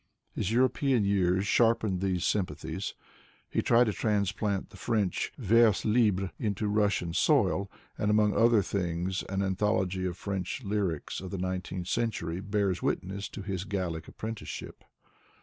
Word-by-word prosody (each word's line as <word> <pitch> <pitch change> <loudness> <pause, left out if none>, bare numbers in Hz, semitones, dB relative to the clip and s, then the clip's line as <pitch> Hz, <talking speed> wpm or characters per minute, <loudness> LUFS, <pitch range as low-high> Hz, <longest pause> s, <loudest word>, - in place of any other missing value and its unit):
His 100 - -2
European 130 -1 +2
years 95 -1 +2
sharpened 110 -4 +2
these 95 -2 0
sympathies. 100 -4 -2 0.6
He - - +1
tried 120 +1 +5
to 110 -3 0
transplant 100 -2 -1
the 100 - -13
French 105 -3 0
vers 115 -3 +4
libre 105 -4 +2
into 105 -1 -1
Russian 100 -5 +1
soil, 100 - +2 0.3
and 105 - +1
among 105 -1 +3
other 115 -3 +5
things, 90 0 -2
an 95 +1 0
anthology 95 -1 0
of 90 -1 -5
French 100 +5 -4
lyrics 100 -8 -2
of 95 - -6
the 100 - -4
nineteenth 90 -1 -3
century 95 -8 -1
bears 100 -2 0
witness 100 +2 -2
to 100 - -7
hia 95 -2 -3
Gallic 85 -5 -3
apprenticeship. 110 0 -7
100 Hz, 140 wpm, -29 LUFS, 95-105 Hz, 0.6 s, tried